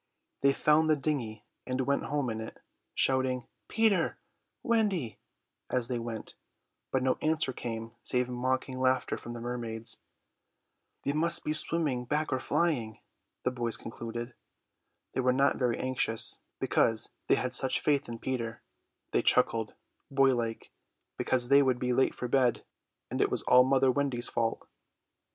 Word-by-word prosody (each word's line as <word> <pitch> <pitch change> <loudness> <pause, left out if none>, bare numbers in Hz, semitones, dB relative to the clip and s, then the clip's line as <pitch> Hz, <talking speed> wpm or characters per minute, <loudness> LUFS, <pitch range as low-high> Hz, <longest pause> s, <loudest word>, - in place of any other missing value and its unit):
They 140 - +5
found 150 +3 +3
the 155 - +5
dinghy 125 -7 -3 0.2
and 130 0 -1
went 140 +2 0
home 140 -4 -1
in 110 0 -4
it, 110 - -8 0.4
shouting 130 -2 +2 0.2
"Peter, 215 -7 +2 0.5
Wendy" 205 - 0 0.5
as 125 -2 0
they 125 -2 -1
went, 115 -1 -6 0.6
but 130 -1 0
no 130 -1 +1
answer 155 -4 +1
came 115 -2 -5
save 125 0 0
mocking 130 +1 -2
laughter 130 0 +1
from 120 - -8
the 120 - -6
mermaids. 115 -1 -3 1.0
"They 140 - 0
must 165 +2 +2
be 150 - 0
swimming 150 -5 +1
back 150 +4 0
or 130 - 0
flying," 125 -12 0 0.5
the 125 - +1
boys 120 -2 -2
concluded. 120 +1 -6 0.8
They - - 0
were 125 0 +3
not 135 +2 +3
very 125 -3 +1
anxious, 130 -3 -1 0.2
because 110 -1 +2 0.2
they - - +5
had 125 -1 -2
such 130 +1 +3
faith 145 -3 +1
in 115 - -5
Peter. 115 -2 -4 0.5
They - - +2
chuckled, 115 -3 +2 0.3
boylike, 130 -5 +1 0.4
because 125 -1 0
they 140 +1 +7
would 130 -3 +2
be 125 0 0
late 130 +2 +2
for 125 - -4
bed; 125 -1 +2 0.5
and - - -1
it - - +3
was - - 0
all 125 0 +7
mother 130 0 +4
Wendy's 130 -3 -1
fault! 115 -1 -1
130 Hz, 150 wpm, -30 LUFS, 120-140 Hz, 1.0 s, they